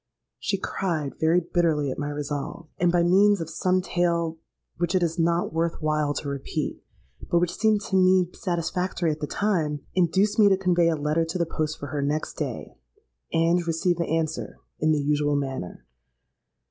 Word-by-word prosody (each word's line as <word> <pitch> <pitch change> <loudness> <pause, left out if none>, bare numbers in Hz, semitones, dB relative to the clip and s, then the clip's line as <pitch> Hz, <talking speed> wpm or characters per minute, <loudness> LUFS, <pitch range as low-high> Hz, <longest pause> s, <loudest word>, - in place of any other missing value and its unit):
She 200 - -1
cried 165 -7 -2
very 160 +2 +4
bitterly 165 -5 +1
at - - -5
my 145 0 -2
resolve, 145 +2 -4
and 175 0 +3
by 175 -1 +3
means 200 +3 +4
of 165 -1 -5
some 185 +2 +1
tale 170 -3 0 0.4
which 175 +2 0
it 185 - +3
is 170 0 -1
not 170 +1 +1
worth 165 0 -1
while 150 -2 0
to 145 - -4
repeat, 140 +2 -3 0.5
but 175 - +3
which 170 0 +1
seemed 215 -1 +2
to 195 - -3
me 185 -1 +5
satisfactory 175 -1 -1
at 150 - -4
the 150 - -3
time, 160 -9 0
induced 190 +4 +2
me 205 -2 +7
to 190 - +4
convey 175 -3 +3
a 165 - +1
letter 150 +2 0
to 165 +3 -3
the 170 - +1
post 155 -1 -3
for 145 - -7
her 145 -2 -2
next 145 +2 -1
day, - - -5 0.5
and 170 +1 +2
receive 170 +1 +1
the 170 - -1
answer 160 -1 -2 0.2
in 155 0 +2
the 155 - +3
usual 145 0 +1
manner. 135 - -4
165 Hz, 185 wpm, -25 LUFS, 150-180 Hz, 0.5 s, me